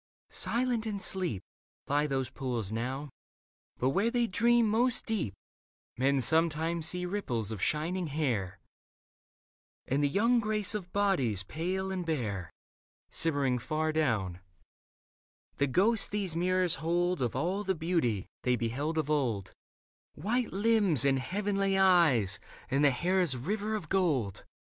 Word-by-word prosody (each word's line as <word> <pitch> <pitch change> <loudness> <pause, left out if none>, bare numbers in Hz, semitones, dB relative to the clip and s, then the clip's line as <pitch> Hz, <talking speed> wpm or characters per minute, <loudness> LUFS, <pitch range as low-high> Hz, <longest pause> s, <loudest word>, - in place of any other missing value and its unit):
Silent 240 -2 0
and 205 -2 -3
asleep 180 - -2 0.4
Lie 145 +2 +1
those 135 -2 -2
pools 120 -7 -3
now: 130 +5 -3 0.7
but 130 - +1
where 195 +11 +2
they 240 0 +1
dream 235 +3 +3
most 235 +3 +3
deep, 185 - -2 0.6
Men 135 +2 +2
sometimes 160 +3 +1
see 180 +2 -2
ripples 125 - -2
of 105 -4 -5
shining 170 +4 0
hair 120 - -1 1.3
And 140 +3 0
the 145 - +3
young 230 +9 +3
grace 215 -2 +1
of 185 -4 -5
bodies 135 - +1
pale 185 - -3
and 185 -1 -2
bare, 110 - -3 0.6
Shimmering 140 -6 +1
far 155 +5 -1
down 110 - 0 0.6
— - - -49
the 140 - +3
ghosts 200 - +2
these 195 -5 -1
mirrors 180 0 +1
hold 175 0 0
Of 120 -2 -1
all 180 +9 -1
the 190 -1 0
beauty 160 - 0 0.2
they 125 0 +2
beheld 130 +8 -2
of 155 -3 0
old, 120 -11 -1 0.6
White 225 +9 -1
limbs 200 - +3
and 135 -1 +3
heavenly 195 +4 0
eyes 155 - +4 0.3
and 140 +2 +2
the 145 - +7
hair's 175 0 +1
river 210 - -2
of 205 -7 -5
gold. 150 - 0
160 Hz, 140 wpm, -30 LUFS, 130-195 Hz, 1.3 s, the